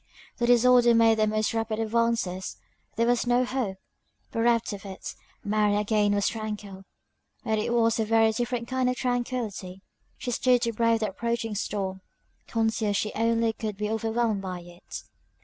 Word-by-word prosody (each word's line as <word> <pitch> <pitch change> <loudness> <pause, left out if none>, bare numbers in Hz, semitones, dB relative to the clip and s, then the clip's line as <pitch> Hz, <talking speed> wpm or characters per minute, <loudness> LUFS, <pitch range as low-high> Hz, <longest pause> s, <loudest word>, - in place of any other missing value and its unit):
The 240 - +1
disorder 245 0 +6
made 225 -1 +5
the 215 - +3
most 215 +1 0
rapid 225 -1 -1
advances 225 -4 -1 0.4
there 230 - +2
was 245 0 +1
no 245 +1 +3
hope! 245 -7 -2 0.5
Bereft 230 -1 +1
of 200 - -8
it, 190 -2 -7 0.3
Mary 210 0 +2
again 210 0 +2
was 205 -1 +1
tranquil; 210 -3 -5 0.6
but 220 -3 0
it 215 - -1
was 230 -1 +2
a 220 - +1
very 225 0 +4
different 240 +1 -2
kind 260 0 +1
of 250 - 0
tranquillity. 240 -7 -3 0.3
She 245 - -4
stood 250 0 +3
to 230 -1 0
brave 230 0 +2
the 215 - 0
approaching 235 +2 -2
storm, 195 -2 -3 0.5
conscious 220 -2 0
she 210 - -2
only 230 0 +1
could 215 -2 -5
be 210 +1 -2
overwhelmed 225 -1 0
by 185 -2 -5
it. 175 0 -10
225 Hz, 165 wpm, -27 LUFS, 210-235 Hz, 0.6 s, disorder